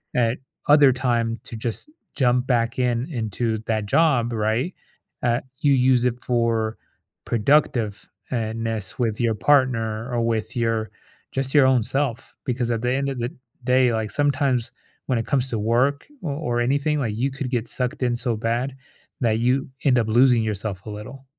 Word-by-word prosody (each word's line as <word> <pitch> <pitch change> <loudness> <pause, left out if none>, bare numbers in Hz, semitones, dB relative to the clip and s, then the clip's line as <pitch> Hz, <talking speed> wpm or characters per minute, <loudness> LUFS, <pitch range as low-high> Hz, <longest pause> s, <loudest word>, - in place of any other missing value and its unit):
at 120 0 +2 0.3
other 145 -2 +7
time 120 -2 0
to - - -7
just 115 - -4 0.3
jump 125 -2 +2
back 115 -2 +1
in 125 0 +1
into 110 -1 -1
that 110 -2 0
job, 120 -1 +2
right, 115 - 0 0.5
uh, 120 +1 +2 0.2
you 145 -1 +3
use 125 -1 +3
it 125 -1 0
for 115 -2 0 0.5
productive 115 -3 +1 0.2
and 115 -2 -2
nest 110 -2 -3
with 110 -3 0
your 115 -1 +2
partner 115 -3 +2
or 120 - +1
with 115 -1 -1
your 115 -2 0 0.4
just 135 0 -2
your 145 -2 +7
own 130 -3 +3
self 130 -1 -2
because 120 -1 -1
at 115 -1 -1
the 125 +1 0
end 135 +2 0
of 135 -2 -4
the 120 +1 -1
d 155 - -19 0.3
day, 125 -1 +3
like, 110 -1 -1
sometimes 135 -3 +1 0.4
when 130 - +1
it 115 - -3
comes 130 -2 +1
to 115 - -2
work 125 +6 +1 0.2
or 155 - -2 0.3
or - - +2
anything, 145 +4 +1
like, 110 -6 -2
you 130 +4 +1
could 135 -1 -4
get 120 -2 -1
sucked 125 +2 -3
in 120 -1 +1
so 120 -1 -1
bad 120 +4 -1 0.5
that 110 -3 +2
you 125 +3 +1 0.2
end 130 -3 +5
up 110 - 0
losing 120 +1 +4
yourself 100 -2 -4
a - - -4
little. 125 +6 -9
120 Hz, 180 wpm, -23 LUFS, 115-130 Hz, 0.5 s, other